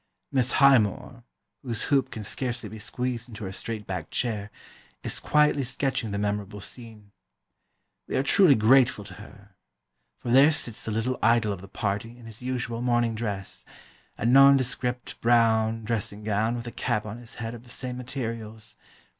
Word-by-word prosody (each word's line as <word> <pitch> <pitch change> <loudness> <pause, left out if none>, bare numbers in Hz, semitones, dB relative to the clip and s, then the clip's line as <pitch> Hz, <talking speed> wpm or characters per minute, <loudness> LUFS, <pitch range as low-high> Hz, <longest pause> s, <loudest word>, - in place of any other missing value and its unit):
Miss 130 -2 +2
Highmore, 120 -3 +3 0.4
whose 120 -5 -2
hoop 135 -1 +3
can 110 - -7
scarcely 120 +3 -3
be 110 - -9
squeezed 125 +1 -4
into 110 -1 -9
her 95 - -4
straight 110 +2 -5
backed 90 -5 -5
chair, 110 -4 -2 0.5
is - - -2
quietly 150 -2 +3
sketching 130 -2 -1
the 100 - -3
memorable 105 0 -2
scene. 110 -1 -10 1.0
We - - -3
are 130 - +2
truly 165 -1 +6
grateful 115 -1 +4
to 100 - -11
her, 105 +1 -14 0.7
for - - -6
there 135 +5 +7
sits 120 -7 -1
the 110 - -2
little 115 +4 -1
idol 115 -2 +3
of 95 - -8
the 95 - -11
party 105 +4 -3
in 120 - -14
his 110 0 -9
usual 125 -2 -3
morning 120 -2 +1
dress, 105 -4 -4 0.5
a - - -3
nondescript 130 -1 +3
brown 115 -1 +3
dressing 105 -2 -3
gown 110 +2 0
with 120 0 -5
a 120 - -6
cap 115 -4 -1
on 110 +2 -7
his 120 -1 -12
head 115 0 -5
of 120 - -9
the 125 - -17
same 125 0 -5
materials. 115 -3 -6
115 Hz, 170 wpm, -26 LUFS, 105-125 Hz, 1.0 s, there